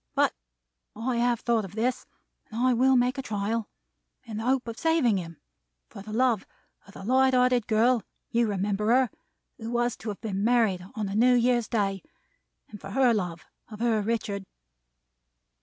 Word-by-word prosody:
But - - +3 0.6
I 235 +2 -2
have 240 -1 +1
thought 235 -2 +1
of 195 0 -9
this; 245 +3 -1 0.4
and 225 - -6
I 255 +1 +3
will 260 +2 +4
make 250 +2 +2
the - - -2
trial. 215 -1 -2 0.5
In 220 -2 -7
the 220 - -4
hope 260 -1 +1
of 230 -1 -6
saving 320 -10 +2
him; 165 -3 -7 0.5
for - - -10
the 215 +2 -9
love 235 -2 +2 0.4
of 200 - -16
the - - -9
light 260 +4 +3
hearted 250 -2 +3
girl 230 +2 +3 0.3
(you 235 0 +2
remember 205 +1 -1
her) 250 +1 +3 0.5
who 225 0 -6
was 240 0 0
to 220 - -6
have 205 - -5
been 200 -2 -3
married 225 -6 +2
on 215 -2 -2
a 195 - -4
New 245 +4 +4
Year's 240 -1 +2
Day; 195 -4 -1 0.7
and 210 - -12
for 195 - -8
the 250 +1 +4
love 175 -6 -3 0.2
of 215 -1 -10
her 230 -2 +1
Richard.' 205 -3 -2
230 Hz, 180 wpm, -27 LUFS, 210-245 Hz, 0.7 s, will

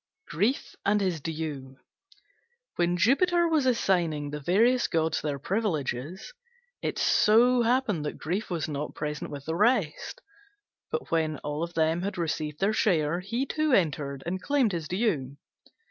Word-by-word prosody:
GRIEF 210 - -1
AND 210 +1 +2
HIS 185 -6 -1
DUE 150 -4 -5 1.0
When 175 0 +1
Jupiter 340 - +3
was 310 -5 +2
assigning 170 - +1
the 150 - -4
various 230 - +3
gods 160 -1 0
their 145 -2 -2
privileges, 175 - -3 0.5
it - - -3
so 240 +3 +4
happened 230 - +1
that 150 - -4
Grief 185 +8 -3
was 165 -5 -2
not 150 -1 -4
present 150 -1 -4
with 140 -1 -8
the 160 - -2
rest: 210 - 0 0.7
but 465 - -4
when 155 -2 +1
all 150 +3 -2
had 170 +4 -1
received 155 -3 -3
their 200 +2 +2
share, 170 -6 +1
he 230 +8 -2
too 310 +1 0
entered 145 - 0
and 185 +2 -3
claimed 275 -4 +2
his 165 -3 -4
due. 165 - -1
175 Hz, 145 wpm, -27 LUFS, 150-220 Hz, 1.0 s, so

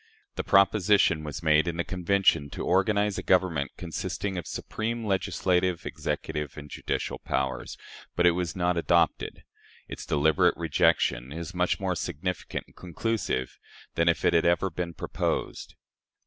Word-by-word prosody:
The - - -3
proposition 100 -4 +4
was 75 +2 -6
made 75 +1 +4
in 85 -1 -2
the 85 - 0
Convention 95 -5 +1
to - - -4
organize 100 +2 +2
a - - -3
government 90 -6 +1
consisting 95 +3 -4
of 90 - -5
"supreme 115 +1 -4
legislative, 90 -2 0
executive, 75 -3 -4
and 75 0 -9
judicial - - -3
powers," 65 0 -3 0.4
but 90 - +2
it 90 - +7
was 85 -2 -2
not 90 -1 +1
adopted. 85 0 +1 0.4
Its - - -7
deliberate 75 +1 +3
rejection 60 +3 +1
is 85 +2 -6
much 90 0 0
more 95 -2 0
significant 90 +1 -4
and - - -24
conclusive 90 - -3 0.3
than 85 +1 +2
if 85 - +1
it - - +4
had 85 - +4
never 85 +2 +2
been 85 0 -4
proposed. - - -3
85 Hz, 150 wpm, -27 LUFS, 80-95 Hz, 0.4 s, it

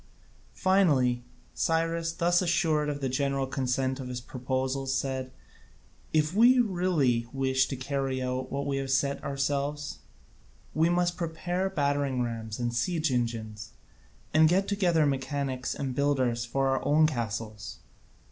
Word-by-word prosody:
Finally 140 -11 +3 0.3
Cyrus, 165 0 0
thus 175 +1 +2
assured 160 -4 +1
of 145 -1 -4
the 135 - 0
general 135 +1 0
consent 130 0 -1
to 135 - -6
his 125 -1 -4
proposals, 130 +2 -2
said, 130 -1 -2 0.8
"If 155 +1 +2
we 240 +5 +6
really 175 - +1
wish 130 -1 +1
to 135 - -4
carry 135 0 -2
out 130 0 -3
what 140 +1 -2
we 140 -1 -1
have 135 -1 -3
set 140 +1 +1
ourselves, 140 +1 -2 0.7
we 160 +2 +3
must 175 0 +1
prepare 175 +3 -2
battering 140 -6 0
rams 115 -2 -4
and 120 -1 -2
siege 155 +5 0
engines, 115 -4 -3 0.6
and 155 0 +6
get 190 +3 +2
together 175 -6 +2
mechanics 135 -1 -2
and 135 -2 -3
builders 130 -4 +1
for 135 +3 0
our 135 - 0
own 155 +2 +4
castles." 110 -6 -3
140 Hz, 140 wpm, -28 LUFS, 130-160 Hz, 0.8 s, we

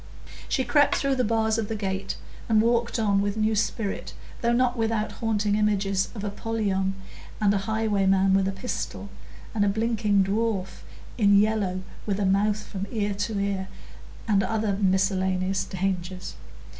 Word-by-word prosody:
She 260 - +1
crept 285 +3 +3
through 275 -1 +1
the 250 - +2
bars 220 0 +1
of 215 - -2
the 225 - -3
gate 195 -2 -3 0.3
and 220 -1 +5
walked 235 +2 +2
on 200 -3 +2
with 205 +1 -1
new 215 0 +2
spirit, 210 -1 -2 0.3
though 235 - +2
not 245 +1 +2
without 225 -2 0
haunting 210 -2 0
images 200 -2 +1
of 205 - -5
Apollyon, 200 -2 -1 0.4
and 205 -1 +3
a 200 - +1
highwayman 195 -3 +2
with 195 0 +3
a - - 0
pistol, 200 0 -5 0.4
and 210 -2 +1
a 205 - +3
blinking 215 -2 +2
dwarf 200 -1 -1 0.4
in 200 -2 +5
yellow 205 -3 +1 0.3
with 200 -1 0
a 200 - +1
mouth 205 +2 +2
from 195 -1 -5
ear 205 -3 -1
to 205 +1 -2
ear, 200 -1 -1 0.6
and 205 -3 +3
other 215 -1 0
miscellaneous 190 0 +1
dangers. 185 -1 -3
205 Hz, 155 wpm, -26 LUFS, 195-220 Hz, 0.6 s, and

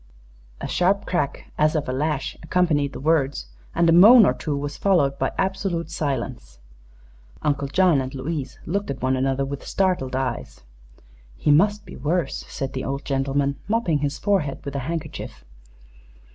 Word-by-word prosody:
A - - -4
sharp 190 +3 +1
crack, 175 -6 -2
as 155 +1 +3
of 150 -1 -1
a 130 - -2
lash, 145 0 -1
accompanied 160 -4 +1
the - - -7
words, 145 - +1 0.3
and 170 - +3
a - - +5
moan 215 +7 +9
or - - +3
two 150 -3 -3
was 145 0 -4
followed 160 -9 +2
by - - 0
absolute 190 -4 -1
silence. 125 - -4 0.9
Uncle 140 -1 0
John 175 -1 +3
and 130 0 -5
Louise 140 +1 -4
looked 200 +5 -2
at 135 -2 -5
one 130 0 +2
another 135 +1 0
with 140 0 -6
startled 180 -10 0
eyes. 130 - -3 0.8
"He 145 - +2
must 205 +7 +3
be - - -10
worse," 155 +2 -1
said 135 -1 -4
the 130 - -3
old 140 +1 -4
gentleman, 140 0 0
mopping 205 -8 +1
his 145 0 -2
forehead 185 -11 -1
with 140 0 -5
a - - 0
handkerchief. 160 - -6
145 Hz, 165 wpm, -23 LUFS, 135-175 Hz, 0.9 s, moan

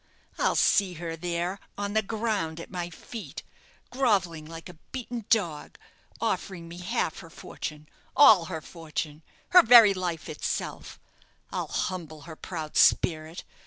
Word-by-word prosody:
I'll - - +2
see 190 -3 +3
her 165 0 -5
there, 175 +3 -3 0.2
on 205 0 -3
the 220 - +3
ground 210 -6 -2
at - - -9
my 175 -2 -4
feet, 215 +6 -9 0.5
grovelling 190 -12 +1
like 165 0 -9
a 175 -3 -13
beaten 240 -3 -5
dog, 170 -10 0 0.4
offering 175 -4 -3
me 170 +1 -9
half 180 -3 -2
her 165 - -11
fortune 150 -1 -8 0.3
all 220 -11 +7
her 160 0 -5
fortune 155 -2 -6 0.3
her 360 - +9
very 230 -5 +8
life 175 -4 -4
itself! 150 - -4 0.5
I'll - - -3
humble 160 -5 -4
her 160 +2 -10
proud 160 -3 -6
spirit! 160 0 +3
175 Hz, 140 wpm, -27 LUFS, 160-205 Hz, 0.5 s, her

